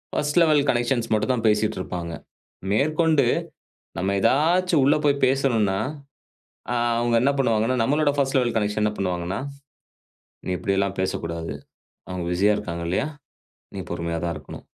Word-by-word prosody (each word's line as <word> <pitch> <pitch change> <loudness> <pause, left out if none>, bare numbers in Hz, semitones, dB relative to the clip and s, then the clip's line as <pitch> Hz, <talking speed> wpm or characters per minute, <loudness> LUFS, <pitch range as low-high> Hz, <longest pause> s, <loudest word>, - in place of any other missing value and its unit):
First 150 +3 +1
level 155 -3 +4
connections 120 -1 0
மட்டும் 110 +4 +1
தான் 115 -2 -2
பேசிட்ருப்பாங்க. 95 -5 -1 0.6
மேற்கொண்டு 155 +3 +2 0.7
நம்ம 95 +3 0
ஏதாச்சும் 165 - +3
உள்ள 140 +2 +4
போய் 140 -1 +2
பேசணுன்னா, 115 -8 +1 0.9
அ - - 0 0.2
அவுங்க 120 0 +1
என்ன 135 - +4
பண்ணுவாங்கணா, 115 -2 +2
நம்மளோட 145 +3 +2
ஃபர்ஸ்ட் 135 0 +1
லெவல் 120 -3 0
கனெக்ஷன் 105 0 -1
என்ன 105 - +1
பண்ணுவாங்கணா, 90 0 -2 1.1
நீ - - -4
இப்பிடியெல்லாம் 100 0 -1
பேசக்கூடாது. 85 -3 -3 0.5
அவுங்க 90 -1 -4
பிசியா 100 +4 +3
இருக்காங்க 85 -3 -5
இல்லயா? 95 +10 0 0.7
நீ - - -5
பொறுமையா 85 0 -3
தான் 85 -1 -1
இருக்கணும் 75 - -10
110 Hz, 135 wpm, -24 LUFS, 95-140 Hz, 1.1 s, லெவல்